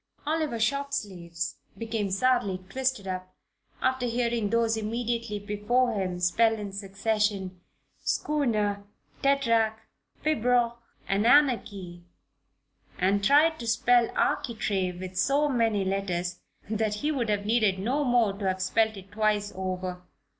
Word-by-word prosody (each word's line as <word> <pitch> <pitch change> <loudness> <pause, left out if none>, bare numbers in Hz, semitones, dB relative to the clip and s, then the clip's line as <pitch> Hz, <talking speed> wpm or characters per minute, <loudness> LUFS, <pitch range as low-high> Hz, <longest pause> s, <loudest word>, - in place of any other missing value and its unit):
Oliver 310 -5 -1
Shortsleeves 205 -10 -2 0.2
became 225 -3 -2
sadly 195 -3 +1
twisted 260 -4 -1
up 185 0 -5 0.5
after 260 -1 +1
hearing 235 -2 0
those 230 0 +2
immediately 230 0 -2
before 210 +5 0
him 185 -3 -2
spell 225 +6 +3
in 205 -2 -6
succession 195 -1 -1 0.4
"schooner, 215 -9 0 0.4
tetrarch, 230 -6 +2 0.5
pibroch 245 -5 +2 0.3
and 200 +3 +1
anarchy" 205 -10 +2 0.9
and 195 +2 +1
tried 305 +7 +4
to 235 - -6
spell 235 +1 +3
"architrave" 190 -6 0
with 185 0 -7
so 285 +5 +3
many 225 -7 +1
letters 180 -2 -2 0.3
that 215 0 -1
he 295 +9 -1
would 245 -7 -1
have 205 -1 0
needed 215 -3 +2
no 250 +10 0
more 240 -6 +3
to 200 0 -6
have 190 0 0
spelled 220 +3 +1
it 195 +1 -12
twice 210 -1 0
over. 185 -1 -4
215 Hz, 125 wpm, -27 LUFS, 195-240 Hz, 0.9 s, tried